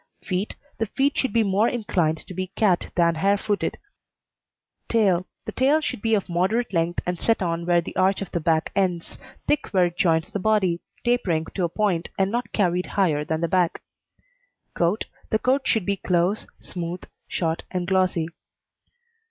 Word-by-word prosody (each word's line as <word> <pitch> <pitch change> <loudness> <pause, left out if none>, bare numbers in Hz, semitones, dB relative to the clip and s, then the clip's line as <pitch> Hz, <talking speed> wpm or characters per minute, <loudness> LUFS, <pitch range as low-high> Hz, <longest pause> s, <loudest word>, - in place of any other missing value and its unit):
FEET 185 +1 -2 0.2
The 225 - 0
feet 275 +6 +1
should 260 - 0
be 230 +1 +3
more 205 +3 +2
inclined 175 -9 0
to - - -9
be 185 +1 -3
cat 190 -5 +2
than 170 -1 +4
hare 195 +5 +2
footed. 205 0 -1 1.1
TAIL 190 -6 +3 0.2
The - - -4
tail 275 +4 +3
should 300 - -3
be 225 -1 +3
of 200 - -1
moderate 190 +7 0
length 170 0 0
and 180 -1 -2
set 225 -4 +1
on 170 0 -2
where 175 -1 +4
the - - -8
arch 190 +1 +3
of 195 - -6
the 170 - -1
back 160 -1 +1
ends; 180 -4 -1 0.3
thick 300 - +1
where 185 -3 +3
it 175 0 -4
joins 165 +2 +2
the 205 - -2
body, 190 -4 +2 0.3
tapering 185 -10 +1
to 185 - 0
a - - -2
point, 185 -3 0
and 195 0 +2
not 240 +2 -2
carried 180 -3 +1
higher 160 -7 +3
than 160 +1 -2
the 170 - +1
back. 180 0 +1 0.9
COAT 175 +5 +1 0.2
The 220 - +3
coat 265 +4 +1
should 220 -6 +2
be 200 -1 0
close, 180 +3 +1
smooth, 175 0 -5 0.2
short 165 -2 -1
and 180 -1 -2
glossy. 185 -3 +2
185 Hz, 180 wpm, -24 LUFS, 170-215 Hz, 1.1 s, than